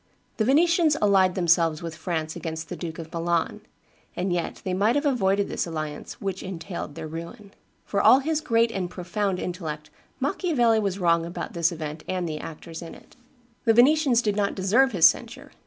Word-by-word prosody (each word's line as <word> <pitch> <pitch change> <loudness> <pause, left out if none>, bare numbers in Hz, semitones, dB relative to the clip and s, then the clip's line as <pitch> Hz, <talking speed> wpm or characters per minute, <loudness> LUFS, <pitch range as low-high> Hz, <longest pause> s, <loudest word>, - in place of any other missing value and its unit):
The 220 - +1
Venetians 320 +3 +4
allied 195 -3 +3
themselves 170 -2 +2
with 165 -1 -5
France 160 -1 -3
against 160 -1 -5
the 180 - -4
Duke 165 -2 -6
of 160 -1 -9
Milan; 170 0 -1 0.5
and 180 0 -1
yet 175 -1 -3
they 185 - -1
might 210 +6 +2
have 290 +1 0
avoided 200 -7 +2
this - - -2
alliance, 155 -2 -6
which 195 -1 -4
entailed 175 -4 -6
their 160 -1 -6
ruin." 170 +6 -8 0.3
For 200 - 0
all - - +7
his 305 +3 -1
great 230 -5 +2
and 190 -5 -3
profound 185 +2 -2
intellect, 155 -5 -5 0.3
Machiavelli 265 - +2
was 200 -3 -1
wrong 170 -3 +2
about 170 +1 -6
this 170 0 +1
event 155 -2 -6
and 185 -2 -2
the 155 -1 -4
actors 165 +1 -8
in 165 - -9
it. - - -18 0.5
The 225 -1 +4
Venetians 260 -1 +4
did 210 -2 0
not 200 -1 0
deserve 225 +8 +3
his 175 -6 +4
censure. 160 - +1
185 Hz, 185 wpm, -25 LUFS, 165-225 Hz, 0.5 s, all